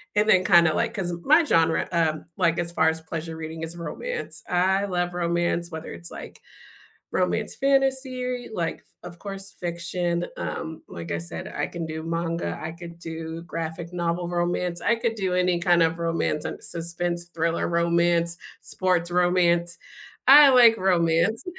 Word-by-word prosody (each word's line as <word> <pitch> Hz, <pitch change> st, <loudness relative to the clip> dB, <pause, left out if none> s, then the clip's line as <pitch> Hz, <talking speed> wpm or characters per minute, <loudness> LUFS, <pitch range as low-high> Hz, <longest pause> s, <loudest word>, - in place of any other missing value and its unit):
and 210 Hz, +1 st, +2 dB
then 185 Hz, -3 st, +5 dB
kinda 170 Hz, -2 st, +5 dB
like -, -, -1 dB
'cause 190 Hz, -5 st, -1 dB
my 310 Hz, +4 st, +5 dB
genre, 165 Hz, -, +2 dB
um, 160 Hz, -2 st, 0 dB
like, 170 Hz, -2 st, +2 dB
as 170 Hz, 0 st, -1 dB
far 160 Hz, -1 st, +3 dB
as 160 Hz, 0 st, -3 dB
pleasure 160 Hz, 0 st, -6 dB
reading, 160 Hz, 0 st, -7 dB
is 165 Hz, +1 st, -3 dB
romance. 480 Hz, -, -2 dB
I 190 Hz, +3 st, +2 dB
love 175 Hz, -2 st, -2 dB
romance, 170 Hz, 0 st, 0 dB
whether 160 Hz, 0 st, -7 dB
it's, 170 Hz, -, -6 dB
like, -, -, -10 dB, 0.7 s
romance -, -, 0 dB
fantasy, 265 Hz, -2 st, 0 dB
like, 170 Hz, -4 st, -3 dB, 0.2 s
of 170 Hz, -, -10 dB
course, 195 Hz, 0 st, -6 dB
fiction, 175 Hz, 0 st, -2 dB
um, 160 Hz, -1 st, -5 dB
like 85 Hz, 0 st, -8 dB
I -, -, -1 dB
said, 85 Hz, 0 st, -3 dB
I -, -, -3 dB
can 170 Hz, -1 st, -6 dB
do 160 Hz, 0 st, -6 dB
manga, 165 Hz, +1 st, -3 dB
I 160 Hz, -, -5 dB
could 170 Hz, 0 st, -11 dB
do 160 Hz, 0 st, -6 dB
graphic 165 Hz, 0 st, -6 dB
novel 175 Hz, 0 st, -2 dB
romance, 175 Hz, 0 st, -1 dB
I 235 Hz, -, +2 dB
could 230 Hz, 0 st, -1 dB
do 190 Hz, -3 st, -2 dB
any 180 Hz, -1 st, +1 dB
kind 175 Hz, -1 st, +3 dB
of 165 Hz, 0 st, +1 dB
romance 165 Hz, -2 st, -1 dB
and -, -, -7 dB
suspense-thriller 170 Hz, 0 st, +1 dB
romance, 170 Hz, 0 st, +2 dB, 0.3 s
sports 180 Hz, -2 st, +1 dB
romance; 175 Hz, -1 st, +2 dB, 0.5 s
I 285 Hz, +1 st, +10 dB
like 240 Hz, -3 st, +7 dB
romance. 180 Hz, +5 st, +1 dB
170 Hz, 160 wpm, -24 LUFS, 165-185 Hz, 0.7 s, I